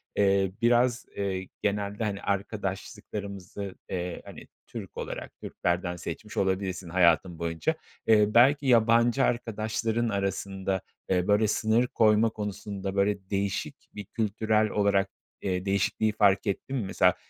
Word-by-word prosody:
eee, 100 -1 +3
biraz, 120 +1 +3
eee, 95 -2 -2
genelde, 105 +1 -1
hani, 100 -2 -2
arkadaşlıklarımızı, 100 -1 -4
eee, 90 -1 -3
hani, - - -11 0.2
Türk - - -8
olarak - - -6
Türklerden 90 0 -2
seçmiş 85 +5 -7
olabilirsin 95 -2 -1
hayatın 85 -1 +3
boyunca. 85 - -1 0.3
Eee, 105 -1 +5
belki 135 +5 +5
yabancı 115 +2 +4
arkadaşların 115 0 -1
arasında, 95 -1 -2 0.3
eee, 90 -1 +1
böyle 105 +1 +4
sınır 110 +3 +2
koyma 110 0 +4
konusunda 100 -2 -5
böyle 100 -1 0
değişik 100 -1 -2 0.2
bir 105 - -6
kültürel 110 0 0
olarak, 100 -2 +2 0.3
eee, 95 0 -2
değişikliği 100 +2 +1
fark 100 -2 +3
ettin 100 +7 -2
mi? 110 - -2
Mesela, 90 -2 +3
100 Hz, 125 wpm, -28 LUFS, 95-110 Hz, 0.3 s, Eee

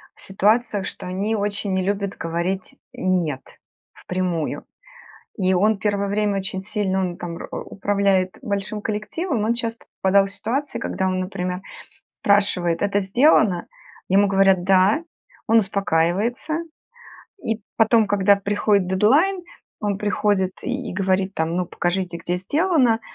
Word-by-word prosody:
в - - -20
ситуациях, 205 0 +1
что - - -8
они 200 +5 -1
очень 205 -1 -1
не 190 0 +1
любят 200 0 -2
говорить 170 +3 -3 0.2
"нет" 170 -7 0 0.5
впрямую. 180 -4 -3 0.7
И 190 -1 +2
он 210 +4 +3
первое 205 -1 0
время 205 0 0
очень 190 0 -4
сильно, 200 -2 -1
он 180 -2 -2
там 170 -1 -6
уп - - -9
управляет 195 -2 0
большим 205 -2 -3
коллективом, 225 - -2
он 230 - +2
часто 230 -1 -3 0.2
попадал 195 +1 +4
в 195 - -4
ситуации, 255 +5 -2
когда 190 -4 -2
он, 185 0 0
например, 180 -1 -3 0.5
спрашивает: 200 -4 +1
"Это 205 0 +1
сделано?" 200 - +3 0.4
Ему 200 +2 +4
говорят: 195 -2 +3
"Да". 195 - +4 0.4
Он 225 - +5
успокаивается 200 - 0 0.8
и 225 0 -1 0.2
потом, 225 -1 +4
когда 200 0 +4
приходит 200 -1 +1
дедлайн, 290 - +3 0.4
он 205 -2 -1
приходит 205 -2 +1
и 255 -2 -3
и - - -5
говорит 190 0 0
там: 165 +1 -1
"Ну, 180 - 0
покажите, 175 0 -2
где 175 +1 -2
сделано?" 260 - +2
200 Hz, 135 wpm, -22 LUFS, 185-215 Hz, 0.8 s, Он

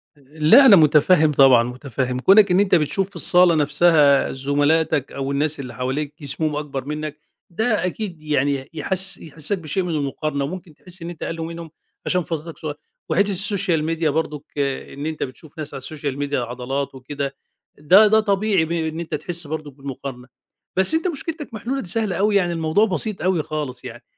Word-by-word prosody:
لأ، 155 - +4
أنا 225 -6 +9
مُتفهم 155 0 +4
طبعًا، 135 -4 +6
مُتفهم، 125 0 -4
كونك 200 +7 +5
إن 180 - +4
أنت 200 -2 +3
بتشوف 170 +5 0
في 200 - -23
الصالة 175 0 +5
نفسها 150 -1 +3
زملاتك 145 +2 0
أو 135 0 -4
الناس 145 +2 -1
اللي 125 -3 -7
حواليك 135 +4 -3
جسمهم 150 +2 -2
أكبر 140 -3 -5
منك، 150 0 -5 0.3
ده 215 +2 0
أكيد 180 -3 -5
يعني 140 -2 -1
يحس 190 +5 -1
يحسسك 160 +4 -3
بشيء 175 +3 -2
من 180 - -4
المُقارنة، 140 0 -2
وممكن 175 +1 -8
تحِسّ 180 +4 -7
إن 170 - -6
أنت 170 -3 -8
أقل 165 - -4
منهم، 165 0 -7 0.3
عشان 180 -1 +1
فترتك 165 0 -6
صغيرة، 150 -2 -6 0.3
وحِتّة 200 +2 +2
الSocial 190 -4 +1
Media 160 0 0
برضو، 150 -1 -2
إن 140 +1 -3
أنت 155 -1 -3
بتشوف 150 +5 -10
ناس 150 -2 -7
على 135 - -6
الSocial 140 -1 -4
Media 145 0 -3
عضلات 125 +2 -3
وكده، 140 +1 -5 0.4
ده 185 +9 +6
ده 220 +1 +4
طبيعي 200 -4 +1
ب 160 - -8
إن 160 -1 -2
أنت 165 -2 -4
تحِسّ 165 +2 -2
برضو 155 -1 -5
بالمقارنة، 135 -2 -8 0.5
بس 190 +10 +4
أنت 325 +3 0
مشكلتك 315 -3 -5
محلولة 250 +5 -3
دي 180 - -7
سهلة 215 -2 -1
أوي 205 +3 +1
يعني 175 -3 +2
الموضوع 165 +5 +2
بسيط 210 +1 -2
أوي 180 -4 +1
خالص 140 -5 -5
يعني، 120 0 -9
155 Hz, 180 wpm, -21 LUFS, 140-180 Hz, 0.5 s, أنا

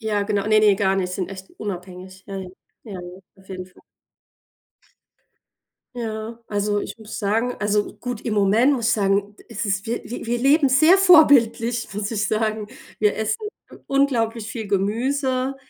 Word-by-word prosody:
Ja, 215 -2 -1
genau. 200 -1 -1
Ne, 215 0 +4
ne, 210 -2 +5
gar 195 -1 +1
nicht. 180 -1 -2
Sind 185 -2 -3
echt 190 0 -10
unabhängig. 185 -1 -8
Ja, 195 -1 -6
ja, 190 -1 -6 0.4
ja, 215 - -9
ja, 185 - -6 0.4
auf 190 0 -21
jeden 185 -1 -7
Fall. 185 - -22 2.1
Ja. 225 -1 -5
Also, 205 0 -1
ich - - -7
muss 220 -1 -8
sagen 225 +4 0
also 210 0 0
gut, 240 +1 -6
im 225 - -3
Moment 210 +7 +4
muss 235 -3 -1
ich - - +3
sagen: 200 0 0
„Es 220 +2 -4
ist 195 +1 -1
wir 235 - -3
wir 245 - -7
wir 240 +1 -1
leben 275 +3 +4
sehr 310 +8 +6
vorbildlich“, 275 - +5
muss 210 0 -3
ich 210 -1 -1
sagen. 215 -1 -1 0.3
Wir 210 -1 +2
essen 220 0 -1 0.3
u - - -11
unglaublich 235 -5 +1
viel 220 -5 -6
Gemüse, 255 +6 0
215 Hz, 170 wpm, -22 LUFS, 200-240 Hz, 2.1 s, sehr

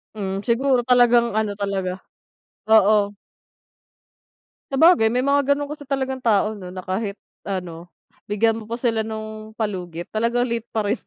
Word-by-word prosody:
Hmm, 195 -1 -3
siguro 250 +1 +2
talagang, 240 -1 +4
ano 205 -2 -2
talaga, 195 -2 -3 0.6
oo. 210 -1 +4 1.6
Sabagay, 275 -5 +5
may 250 +2 0
mga 280 0 +3
ganun 290 0 -4
kasi 295 -1 -7
talagang 265 -2 -2
tao 215 -2 +2
'no, 185 -4 -9
na, 185 0 -8
kahit 200 +2 -3 0.3
ano, 175 -3 -5 0.4
bigyan 225 +2 +1
mo 215 - -13
pa 235 - -3
sila 230 -3 0
nung 215 0 -7
palugit 180 -6 -4
talagang 235 +3 +1
late 235 -1 -3
pa 215 -2 -2
rin. 210 +4 0
220 Hz, 145 wpm, -22 LUFS, 200-245 Hz, 1.6 s, Sabagay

